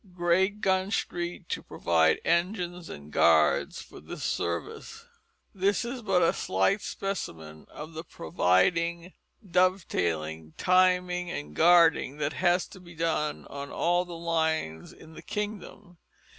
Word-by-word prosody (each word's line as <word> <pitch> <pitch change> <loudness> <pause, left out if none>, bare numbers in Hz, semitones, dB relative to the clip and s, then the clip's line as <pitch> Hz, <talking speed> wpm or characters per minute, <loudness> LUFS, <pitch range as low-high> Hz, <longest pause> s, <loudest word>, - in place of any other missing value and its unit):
Greatgun 190 +2 +1
Street 175 -4 -3
to - - -2
provide 80 -2 +1
Engines 175 -1 -1
and 70 +1 -10
Guards 80 -2 +3
for - - -13
this - - -8
service." 85 0 -4 0.5
This 200 +4 +1
is 245 +1 -5
but 190 -5 +2
a 165 - +3
slight 95 - +1
specimen 80 - -6
of 155 +2 -9
the 160 +1 -6
providing, 170 - 0 0.3
dovetailing, 85 - 0
timing, 180 -1 +2
and 75 - -6
guarding 165 -4 +4
that 150 0 -2
has 175 +1 +2
to 190 - -13
be 175 -1 -14
done 160 -2 -1
on 140 0 -7
all 175 +1 +1
the 175 -2 -9
lines 160 - -1
in 160 0 -15
the - - -11
kingdom. 205 -4 -6
170 Hz, 130 wpm, -28 LUFS, 140-180 Hz, 0.5 s, guarding